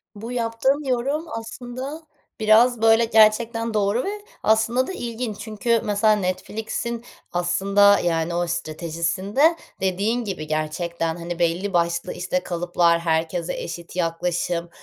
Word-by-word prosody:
Bu 225 +4 -7
yaptığın 250 +5 0
yorum 275 +6 0
aslında 250 +6 -6 0.4
biraz, 225 +2 +4
böyle, 225 +1 +5
gerçekten 225 +1 +3
doğru 210 +4 +1
ve 410 +1 -5 0.2
aslında 225 +4 +2
da 380 - -5
ilginç 235 - -4
çünkü 225 +1 0
mesela 210 +1 +3
Netflix'in 220 +5 -3 0.3
aslında, 195 +3 +4
yani, 170 0 0
o 175 0 0
stratejisinde 170 - 0 0.3
dediğin 205 +6 0
gibi, 180 -7 -5
gerçekten, 165 +2 -2
hani, 175 0 -6
belli 175 +4 0
başlı, 170 0 0
işte, 180 0 -1
kalıplar, 170 -1 +1
herkese 165 +1 -1
eşit 170 +1 -7
yaklaşım 170 0 -1
205 Hz, 120 wpm, -23 LUFS, 170-230 Hz, 0.4 s, böyle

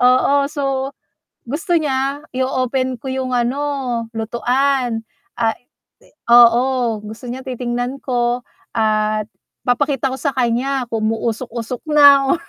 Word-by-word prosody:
oo. 255 +2 +4 0.2
So, 275 -2 -2 0.5
gusto 335 - 0
niya 275 -1 -1
i-o-open 255 0 0
ko 250 - -12
'yung 260 -1 -2
ano, 245 +4 0 0.6
lutuan, 245 +1 0 0.4
ah 225 -1 +2 0.8
oo, 240 0 +5
gusto 220 +3 -9
niya 260 +2 -6
titingnan 245 +1 -3
ko 245 -1 0 0.3
at 215 -1 +1 0.4
papakita 270 +2 +1
ko 260 - -3
sa 280 +2 -1
kanya 250 +1 0
kung 220 -1 -1
umuusok-usok 230 +1 -4
na. 280 -1 +7
250 Hz, 110 wpm, -19 LUFS, 235-270 Hz, 0.8 s, na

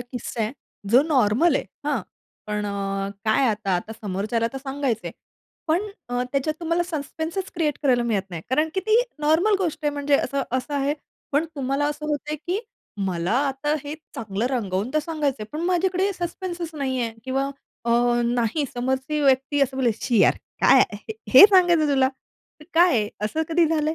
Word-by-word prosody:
किस्सा 245 -1 -6
आहे, 215 - -2 0.4
जो 250 +4 +7
नॉर्मल 270 +3 +3
आहे, - - -2 0.2
हां? 285 -5 +1 0.5
पण 210 0 -2
अ, 195 -1 -2
काय 220 +5 +3
आता, 205 -3 0
आता 215 +5 -5
समोरच्याला 215 +3 -2
तर 270 - -4
सांगायचंय. 270 -4 -2 0.6
पण 330 +4 +2 0.3
अ, 245 0 -1
त्याच्यात 280 +2 0
तुम्हाला 335 +1 +1
सस्पेन्सच 320 +5 -4
क्रिएट 310 -4 0
करायला 250 -4 +3
मिळत 200 -5 -1
नाही, 165 -2 -6
कारण 305 +5 +2
की 380 - +1
ती 440 +2 +5 0.2
नॉर्मल 320 +8 +3
गोष्ट 345 -5 -1
आहे 295 - +3
म्हणजे 285 0 +2
असं 275 0 -1 0.2
असं 285 +3 -5
आहे, 280 +1 +1 0.4
पण 290 +3 +3
तुम्हाला 275 +1 0
असं 295 +1 -5
होतंय 300 0 -2
की 360 +7 -3 0.5
मला 175 +1 -1 0.2
आता 285 +3 -1
हे 290 - -4 0.2
चांगलं 220 0 -2
रंगवून 215 -3 -1
तर - - +4
सांगायचंय, 295 -6 -2
पण 305 - -4
माझ्याकडे 370 +2 +1
सस्पेन्सच 345 -2 -5
नाहीये 260 -5 -1
किंवा 270 +1 -1 0.3
अ, 235 - 0 0.3
नाही 240 +4 0
समोरची 265 +4 -1
व्यक्ती 270 +1 +2
असं 270 -1 +1
बोललीये, 240 -5 +1
"छी 235 -4 +2
यार! - - +5 0.3
काय - - +7
आहे. 440 - -1 0.2
हे - - +11
सांगायचंय 350 -5 +4
तुला!? 270 -2 +3 0.5
हे - - -13
काय 345 +2 +6
आहे?" 215 -5 +1 0.2
असं 315 +9 -1
कधी 335 0 +3
झालंय? 310 0 0
275 Hz, 175 wpm, -24 LUFS, 235-315 Hz, 0.6 s, हे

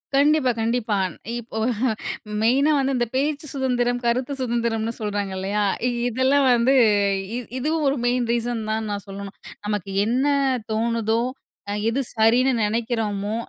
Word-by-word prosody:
கண்டிப்பா 285 -2 +4
கண்டிப்பா. 225 -1 0
அந் 185 - -5 0.2
இப்போ 220 -1 -8 0.8
மெயினா 270 +7 +3
வந்து 270 0 +1
இந்த 240 - +1
பேச்சு 290 +3 0
சுதந்திரம், 245 -2 0
கருத்து 250 +4 0
சுதந்திரம்னு 230 -2 -1
சொல்றாங்க 205 -2 -2
இல்லயா! 200 +2 -1 0.2
இ - - +2 0.2
இதெல்லாம் 265 +3 +2
வந்து 240 +3 +3 0.6
இ - - -1 0.2
இதுவும் 305 +3 0
ஒரு 275 - +2
மெயின் 245 -1 +1
ரீசன் 235 -1 -1
தான் 220 0 -1
நான் 200 -1 -4
சொல்லணும். 195 0 -8 0.3
நமக்கு 205 -2 -2 0.2
என்ன 250 +5 +1 0.5
தோணுதோ! 225 0 +1 0.5
அ - - -1 0.2
எது 270 +4 0
சரின்னு 240 +4 +4
நெனைக்கிறோமோ! 215 -2 -1
235 Hz, 140 wpm, -23 LUFS, 220-260 Hz, 0.8 s, கண்டிப்பா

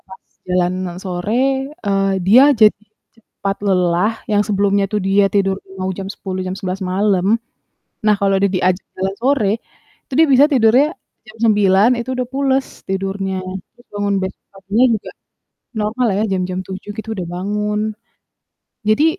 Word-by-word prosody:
Pas 190 0 -12 0.3
jalanan 180 0 -1
sore, 180 +3 -3 0.5
eee, 195 -1 +1
dia 240 +7 +8 0.2
jadi 215 -1 +6 0.4
cepat 200 -3 -5
lelah, 180 +2 +2 0.2
yang 205 -1 +4
sebelumnya 200 -1 +2
itu 210 - -1
dia 200 +1 +4
tidur 195 -1 +2 0.2
mau 185 0 -2
jam 195 -1 -5
10, 185 -1 -5
jam 185 - -3
11 190 0 -4
malam. 195 -1 +1 0.8
Nah 210 -1 +5
kalau 195 -1 +2
dia 200 - +3
diajak 185 0 +1
jalan 190 +1 -2
sore, 255 -5 +2 0.6
itu - - -12
dia 320 - +6
bisa 270 +3 +7
tidurnya 250 +2 +4 0.4
jam 215 +1 -14
9, 205 0 +4
itu 235 - -5
udah 250 -1 -2
pules, 270 -1 +1 0.2
tidurnya. 195 0 -2 0.4
Jadi - - -20
bangun 205 -1 0
besok 190 0 -6
paginya 200 +5 +1
juga 210 - -7 0.7
normal 225 +4 0
ya, 210 - +1
jam-jam 185 -1 -1
7 190 +2 -7
gitu 220 0 -6
udah 180 -4 -4
bangun. 210 +3 -2 1.1
Jadi 215 +8 +4
200 Hz, 150 wpm, -18 LUFS, 190-215 Hz, 1.1 s, dia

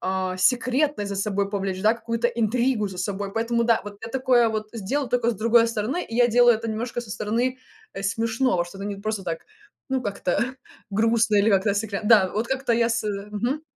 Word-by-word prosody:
а, 185 0 -2
секретность 250 +2 +1
за 200 - -3
собой 200 0 -1
повлечь 195 -2 -3
да, 215 +1 +5
какую-то 230 +1 -1
интригу 235 0 0
за 185 - -9
собой. 195 +1 -3
Поэтому 235 +1 0
да, 230 -1 +3
вот 205 -1 -8
я - - -6
такое 255 -2 +3
вот 215 -1 -3
сделаю 245 +6 -2
тока 240 -1 +2
с - - -3
другой 230 +2 +4
стороны. 230 +10 -2
И 225 - -9
я 245 +1 +5
делаю 240 +1 +5
это 225 0 -4
немножко 235 +2 -3
со 220 - -12
стороны, 240 +6 -1 0.4
э, 195 - -5
смешного, 225 -1 0
что 175 +3 -12
это 195 - -5
не 205 -1 -4
просто 215 0 -3
так, 165 -2 -3 0.5
ну, 265 -1 -1
как-то 200 -4 -2 0.5
грустно 225 +1 +2
или 200 +2 +4
как-то 200 0 +3
секля 205 -1 -2
Да, 210 -3 +6
вот 220 +3 -1
как-то 265 -1 -1
я 230 0 +2
с 230 -1 -1 0.3
Мгм. 240 +9 -2
225 Hz, 205 wpm, -24 LUFS, 200-240 Hz, 0.5 s, Да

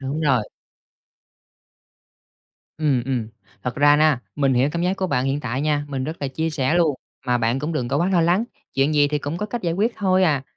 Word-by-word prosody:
Đúng 140 +3 -3
rồi. 135 -8 +2 2.3
Ừm, 145 -6 +1
ừm. 125 -5 -2 0.3
Thật 125 - -3
ra, 145 -1 +4 0.2
mình 135 -3 +2
hiểu 130 +4 +3
cảm 170 +1 -2
giác 185 +2 0
của 190 -1 -1
bạn 125 -6 0
hiện 135 +2 -1
tại 130 0 -3
nha, 150 -1 0
mình 135 -2 -3
rất 155 +3 -4
là 140 - -2
chia 160 +4 -2
sẻ 150 0 0
luôn. 165 -4 +3 0.3
Mà 125 0 +2
bạn 115 +2 +1
cũng 150 +4 -3
đừng 125 -6 -2
có - - 0
quá 170 +5 +1
lo 180 - +3
lắng, 175 +6 +2 0.3
chuyện 140 +3 +2
gì 145 -1 +4
thì 150 0 -1
cũng 145 +3 -4
có 210 - -2
cách 235 0 -5
giải 170 - 0
quyết 215 +7 +1
thôi 190 -2 +2
à. 145 -5 +2
145 Hz, 220 wpm, -22 LUFS, 135-165 Hz, 2.3 s, ra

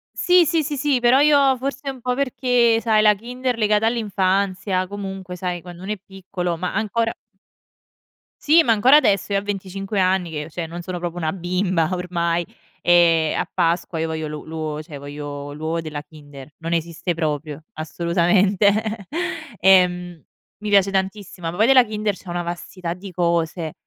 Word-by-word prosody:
Sì, 360 -1 +4
sì, 325 +1 +1
sì, 295 0 -3
sì, 280 -2 +1
però 245 +2 +4
io 285 -2 +5
forse 275 +2 -4
un 265 -2 -7
po' 250 +1 -1
perché 245 -3 +2
sai, 220 -2 +3
la 210 -1 +6
Kinder 250 +3 -3
legata 215 -1 +2
all'infanzia, 195 -4 0
comunque 190 -2 -7
sai, 180 -1 -3
quando 175 0 -11
uno 195 - -4
è - - -7
piccolo, 185 -3 -5
ma 180 +2 -3
ancora 225 +2 0 1.3
Sì, 325 +3 +6
ma 235 - +2
ancora 245 +6 +5
adesso 205 -9 +3
io - - +3
a 195 - -2
25 195 0 -4
anni 185 -2 +1
che 150 0 -5
cioè, 165 +1 -5
non 170 +2 -7
sono 180 +1 -5
proprio 175 -1 -4
una 160 -2 -1
bimba 180 -1 0
ormai, 175 -1 -1 0.4
ehm, 165 -2 +4
a - - -2
Pasqua 170 -1 0
io 160 - -1
voglio 160 -1 -3
lu 150 0 -7
l'uovo, 155 -1 -4
cioè 155 -2 -10
voglio 145 0 -7
l'uovo 160 +3 -3
della 155 -2 -5
Kinder. 145 -2 -13
Non 165 +1 -4
esiste 170 +1 -2
proprio. 155 -1 -3
Assolutamente. 195 +6 +1 0.5
Ehm, 180 -3 +3 0.3
mi 210 0 -5
piace 200 -1 +4
tantissimo, 190 -3 -3
ma - - -8
poi 220 +5 +3
della 260 -1 +7
Kinder 215 -2 -2
c'è 185 - -13
una 175 0 -2
vastità 175 0 -5
di 190 +1 -10
cose: 170 -2 -1
185 Hz, 170 wpm, -21 LUFS, 170-215 Hz, 1.3 s, della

